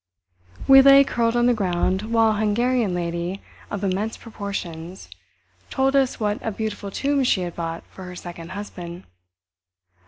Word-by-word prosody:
We 270 0 +9
lay 275 +1 +8
curled 235 -3 0
on 240 0 +3
the 245 - +4
ground 190 +1 -1
while 225 -1 +4
a 210 - -1
Hungarian 220 -1 +1
lady 170 +2 -3 0.3
of 205 0 -4
immense 200 +4 -1
proportions 190 - -7 0.6
told 270 +1 +1
us 270 -2 +2
what 210 -1 -1
a - - -1
beautiful 215 -1 -4
tomb 280 +6 0
she 215 -6 +2
had 175 -1 -5
bought 165 -1 -4
for 190 - -12
her 180 0 -8
second 175 0 -8
husband. 180 -3 -8
205 Hz, 155 wpm, -23 LUFS, 180-235 Hz, 0.6 s, We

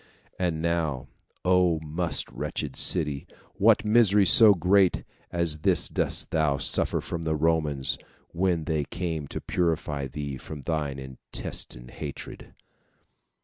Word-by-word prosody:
And 85 -3 -1
now, 80 -6 -1 0.4
"O 90 -3 +3
most 80 +3 -1
wretched 70 -3 -4
city, 75 -6 +1 0.3
what 110 +1 +4
misery 105 -2 +4
so 105 +2 +7
great 95 +2 +2 0.3
as 85 -3 -1
this - - +2
didst - - -1
thou 75 -3 +1
suffer - - +1
from 85 -1 -5
the 80 -1 -1
Romans, 75 -3 0 0.3
when 85 -2 0
they 75 -1 -1
came 80 -4 -4
to - - -5
purify 80 -5 -2
thee 70 0 -6
from 75 +2 -9
thy 75 0 -2
intestine 65 -2 -5
hatred! 75 +1 -9
80 Hz, 125 wpm, -26 LUFS, 75-90 Hz, 0.4 s, so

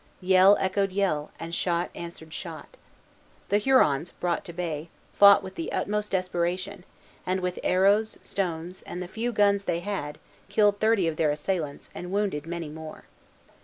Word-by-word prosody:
Yell 190 +2 +6
echoed 195 +1 0
yell, 185 -7 0
and 165 0 -6
shot 175 0 0
answered 170 -2 -9
shot. - - -8 0.7
The 205 - +3
Hurons, 175 - +3
brought 175 -1 -2
to - - -7
bay, 165 -2 -4 0.2
fought 200 0 +7
with 190 - -8
the 165 - -5
utmost 210 0 -1
desperation, 185 +1 -2 0.4
and 185 +1 0
with 180 -1 -3
arrows, 200 +4 +3
stones, 180 -1 -3
and 180 - -5
the - - -7
few 230 +6 -3
guns 200 -2 +2
they 170 - -1
had, 175 -7 -4 0.3
killed 205 0 +3
thirty 215 -5 +3
of 160 -1 -2
their 155 - +2
assailants, 150 0 -3
and 180 0 -7
wounded 195 -7 -1
many 170 -1 -4
more. 160 +1 -9
185 Hz, 160 wpm, -27 LUFS, 165-200 Hz, 0.7 s, fought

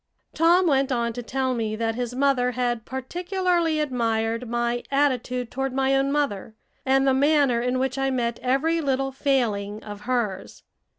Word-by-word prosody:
Tom 340 +3 +4
went 275 -4 +2
on 235 -2 0
to 245 - -5
tell 260 +2 -1
me 220 -3 -2
that 225 0 -1
his 245 +1 -4
mother 260 -2 +2
had 240 -2 -1
particularly 345 +4 -1
admired 230 -4 -1
my 240 0 -1
attitude 250 -3 0
toward 270 0 -2
my 270 0 +2
own 270 +1 +1
mother, 225 -8 -2 0.3
and 270 +1 +3
the 270 - +4
manner 280 -3 +3
in 250 +1 0
which 265 +1 -1
I 270 0 +1
met 235 -3 -1
every 300 +6 +1
little 270 -2 0
failing 220 -7 -1
of 205 -1 -8
hers. 215 -5 -3
255 Hz, 165 wpm, -24 LUFS, 235-275 Hz, 0.3 s, Tom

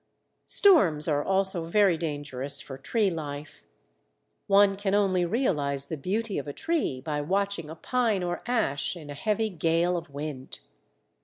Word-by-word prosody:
Storms 180 - +5
are 145 -2 +1
also 190 -3 0
very 195 0 +4
dangerous 145 -4 -2
for 135 - -8
tree 200 - 0
life. 150 -2 -7 0.8
One 200 -1 +5
can 200 0 -1
only 190 -3 +2
realize 150 - 0
the 160 - -4
beauty 200 +7 -2
of 140 - -7
a 145 - -5
tree 320 - -1
by 150 +2 -3
watching 195 0 -1
a 160 - -7
pine 225 0 0
or 175 0 -3
ash 200 - 0
in 150 -3 -9
a - - -5
heavy 215 +7 -1
gale 170 +1 +1
of 170 -2 -5
wind. 140 -2 -7
170 Hz, 155 wpm, -27 LUFS, 145-200 Hz, 0.8 s, Storms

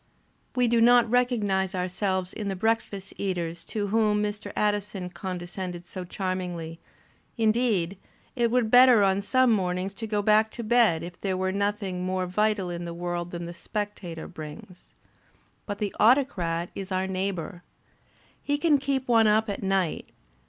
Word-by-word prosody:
We 250 -1 +3
do 235 0 +3
not 240 0 +6
recognize 205 -7 +1
ourselves 185 0 -1
in 210 - -5
the 195 - -2
breakfast 210 -1 -1
eaters 175 -4 -3
to 205 -2 -3
whom 210 -1 +2
Mr. 210 0 -4
Addison 205 -3 -1
condescended 180 -1 -6
so 185 0 -7
charmingly; 180 -3 -4 0.6
indeed, 215 -5 +1 0.4
it 240 -2 +2
were 250 +1 +2
better 245 -1 +7
on 195 0 +2
some 255 +4 +3
mornings 185 -2 0
to 225 +2 -6
go 210 -1 -1
back 215 +1 +4
to 235 - -5
bed 220 -8 +3
if 175 +1 -9
there 190 -2 -1
were 190 0 0
nothrog 200 -2 -1
more 185 0 -1
vital 200 0 0
in 175 0 -5
the 170 0 -6
world 175 0 -3
than 170 -1 -6
the 170 - -7
Spectator 195 -4 -5
brings. 160 +2 -11 0.7
But 205 -1 -3
the 205 -2 -3
Autocrat 195 -9 +2
is 195 0 -7
our 185 0 0
neighbour. 190 -1 -3 0.9
H^ 290 0 +2
can 300 -3 +3
keep 270 -1 -1
one 225 -2 +5
up 215 0 +3
at 200 - -5
night. 190 -4 -1
195 Hz, 160 wpm, -26 LUFS, 180-220 Hz, 0.9 s, better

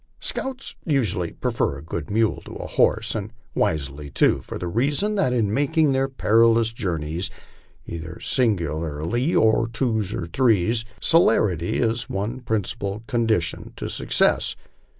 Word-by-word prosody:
Scouts 265 0 -4
usually 110 - 0
prefer 70 - -1
a 70 - -10
good 80 -2 -5
mule 110 +1 +1
to - - -9
a - - -6
horse, 110 +1 +2
and 110 -1 -4 0.2
wisely 70 -1 -1
too, - - +3
for - - -7
the 90 - -4
reason 145 - +1
that 195 -11 +1
in 110 -5 +1
making 145 +2 +2
their 135 0 +1
perilous 115 -2 +3
journeys, 85 -5 -2 0.6
either 85 +1 -7
singly 110 -10 +1
or 75 0 -4 0.6
by - - -12
twos 110 -5 0
or 90 - -3
threes, 115 +3 +2
celerity 105 - +3
is 115 -1 0
one 105 +6 -3
prin 110 -4 -1
cipal 105 +1 -4
condition 115 - -1
to - - -5
success. - - +1
110 Hz, 145 wpm, -23 LUFS, 85-120 Hz, 0.6 s, too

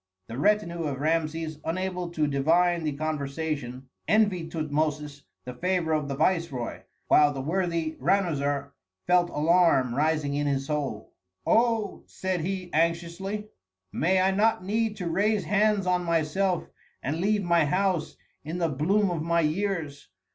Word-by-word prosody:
The 115 +3 -5
retinue 170 -2 +1
of 140 -3 -3
Rameses, 160 0 -1
unable 180 +1 -2
to 160 -3 0
divine 165 +5 +2
the 150 - 0
conversation, 140 -3 -4 0.2
envied 200 -6 +2
Tutmosis 150 -2 -2 0.2
the 125 - -6
favor 175 +2 0
of 150 -2 0
the 140 - -3
viceroy, 165 -8 -1 0.3
while 150 -1 +5
the 140 - -5
worthy 165 +1 -1
Ranuzer 145 -5 0 0.3
felt 180 -1 +3
alarm 155 -6 +3
rising 150 +1 +1
in 145 0 0
his 135 -1 0
soul. 140 -8 -3 0.3
"Oh," 225 -3 +2
said 185 -2 -3
he, 185 +1 -4
anxiously, 170 +6 -1 0.4
"may 185 +4 +2
I 190 +1 +3
not 205 -1 +2
need 220 +1 0
to 180 -3 -4
raise 205 +4 +1
hands 205 +2 +2
on 180 -1 +1
myself 170 +3 0 0.4
and 155 +5 -2
leave 205 +1 +1
my 170 -3 +3
house 185 +1 0 0.3
in 160 +4 -4
the 170 -2 +1
bloom 185 +8 +1
of 165 -3 -2
my 170 +1 +2
years! 160 -3 -2
165 Hz, 145 wpm, -27 LUFS, 150-185 Hz, 0.4 s, while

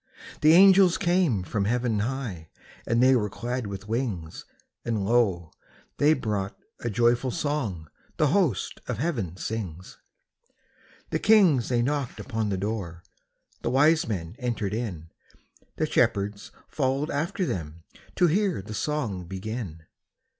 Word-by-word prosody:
The 155 +1 +6
angels 190 0 +7
came 175 - +2
from 100 +2 -2
heaven 120 -1 0
high, 105 -8 -4 0.4
And 115 +2 +3
they 130 0 +6
were 105 -4 0
clad 120 +2 -4
with 100 +1 -7
wings; 110 -9 -3 0.4
And 110 -4 -1
lo, 100 -8 +1 0.5
they 150 +2 +4
brought 105 -6 -3 0.2
a 120 - -3
joyful 120 +3 +2
song 120 - -2 0.3
The 150 - +3
host 165 - 0
of - - -2
heaven 115 - -2
sings. 95 -5 -6 1.1
The - - 0
kings 185 - +4
they 120 -2 +2
knocked 140 -1 -2
upon 110 -4 -2
the 95 - -1
door, 95 -4 -4 0.6
The - - -1
wise 150 +5 +4
men 90 -4 -4
entered 115 -6 -2
in, 95 -9 -4 0.6
The - - 0
shepherds 100 0 0 0.2
followed 135 +1 -1
after 170 +6 -1
them 85 - -5 0.3
To 180 - +4
hear 180 - +1
the 105 - -8
song 110 -8 -2
begin. 95 -3 -6
115 Hz, 135 wpm, -26 LUFS, 100-140 Hz, 1.1 s, angels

